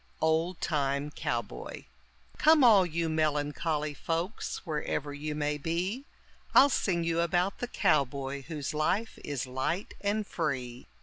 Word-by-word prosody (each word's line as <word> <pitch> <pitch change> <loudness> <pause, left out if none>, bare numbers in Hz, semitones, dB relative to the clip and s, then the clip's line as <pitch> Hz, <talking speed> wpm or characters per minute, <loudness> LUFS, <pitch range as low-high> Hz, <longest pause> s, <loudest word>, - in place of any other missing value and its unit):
OLD 160 +3 +1
TIME 145 -2 0
COWBOY 120 -6 -4 0.5
Come 310 -2 +6
all 205 -7 +7
you 165 0 -1
melancholy 150 0 0
folks 165 +10 -3
wherever 150 -2 -2
you 150 +1 -4
may 150 0 -1
be, 180 - -2 0.5
I'll 280 - +8
sing 180 -9 +1
you 165 0 0
about 175 +3 +1
the 245 - -2
cowboy 140 - +1
whose 150 -4 -4
life 185 +9 0
is 140 -3 -3
light 130 +9 -2
and 205 +1 0
free. 130 -9 -3
160 Hz, 130 wpm, -30 LUFS, 145-180 Hz, 0.5 s, I'll